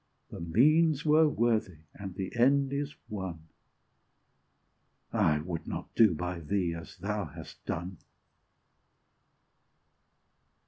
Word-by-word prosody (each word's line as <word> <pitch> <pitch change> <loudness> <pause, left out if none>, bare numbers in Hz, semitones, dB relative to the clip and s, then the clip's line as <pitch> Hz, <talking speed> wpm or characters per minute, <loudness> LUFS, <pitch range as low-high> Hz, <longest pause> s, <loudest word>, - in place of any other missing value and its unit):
The - - -7
means 150 - +3
were 155 +1 +5
worthy, 110 - 0
and 95 -3 -8
the 95 +3 -5
end 135 +3 +3
is 145 +1 -3
won 90 -6 -6 1.6
I 75 -1 +3
would 85 0 -5
not - - -5
do 110 -7 +5
by 90 +2 -3
thee 85 +2 -1
as 85 0 -9
thou - - -2
hast - - -11
done! 90 0 -4
95 Hz, 105 wpm, -30 LUFS, 85-140 Hz, 1.6 s, were